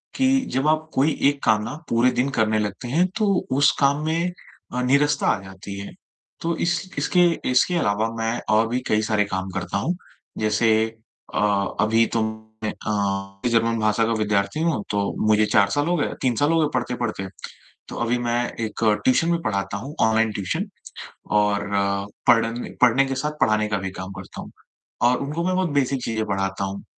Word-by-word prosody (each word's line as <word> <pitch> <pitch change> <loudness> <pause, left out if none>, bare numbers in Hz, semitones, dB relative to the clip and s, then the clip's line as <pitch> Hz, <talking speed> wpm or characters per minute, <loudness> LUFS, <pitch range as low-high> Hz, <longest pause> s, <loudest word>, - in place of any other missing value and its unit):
कि 265 0 +3
जब 135 +3 +1
आप 155 0 +1
कोई 145 +4 +3 0.2
एक 145 -1 -5
काम 105 0 +3 0.2
पूरे 120 +2 +3
दिन 125 +3 0
करने 110 0 +2
लगते 105 +4 -3
हैं 165 +8 +2
तो 215 - +1 0.3
उस 145 +1 +5
काम 140 +2 +2
में 170 +3 0 0.4
अ, 125 - -1
नीरसता 140 +3 +2
आ 100 - +2
जाती 95 +1 -9
है। 100 - -8 0.5
तो 170 0 -1
इस 170 -2 +1 0.2
इसके 180 -1 +3 0.2
इसके 125 +8 +3
अलावा 110 -6 +1
मैं 115 +1 -1 0.2
और 115 +1 +3
भी 125 +2 -1
कई 110 0 +2
सारे 105 -1 +1
काम 95 -1 -3
करता 100 - -2
हूँ। 165 - -1 0.4
जैसे 110 +1 +2 0.6
अ, - - 0 0.4
अभी 115 +1 +3
तो 115 - +2 0.4
मैं 105 - 0
अ, 100 -2 -3
जर्मन 115 0 +2
भाषा 110 +1 +2
का 115 - 0
विद्यार्थी 105 +6 0
हूँ, 160 -11 0
तो 100 -1 -1
मुझे 110 0 +4
4 100 -1 +3
साल 145 +8 0
हो 175 - +2
गए 145 - -1
3 125 -3 +1
साल 145 +6 +2
हो 165 - +3
गए 155 - +3
पढ़ते-पढ़ते। 120 -5 -2 0.6
तो - - -7
अभी 120 +1 +1
मैं 120 0 +1 0.2
एक 110 0 -3 0.2
ट्यूशन 165 +6 +3
में 170 -1 +1
पढ़ाता 100 -6 -2
हूँ, 135 +9 -8
ऑनलाइन 110 0 +3
ट्यूशन 135 - -2 0.8
और 105 -1 +1 0.7
पढ़ 115 -2 +6 0.4
पढ़ने 125 +2 +5
के 135 - -2
साथ 150 +3 -1
पढ़ाने 110 -5 +3
का 105 -1 0
भी 95 0 -4
काम 95 +1 -6
करता 95 - -9
हूँ - - -11 0.6
और 125 - +3
उनको 150 +5 -3
मैं 185 +1 +1
बहुत 185 -3 0
बेसिक 135 -1 0
चीजें 110 -1 -1
पढ़ाता 95 -1 -2
हूँ। 95 +1 -5
115 Hz, 185 wpm, -23 LUFS, 105-145 Hz, 0.8 s, पढ़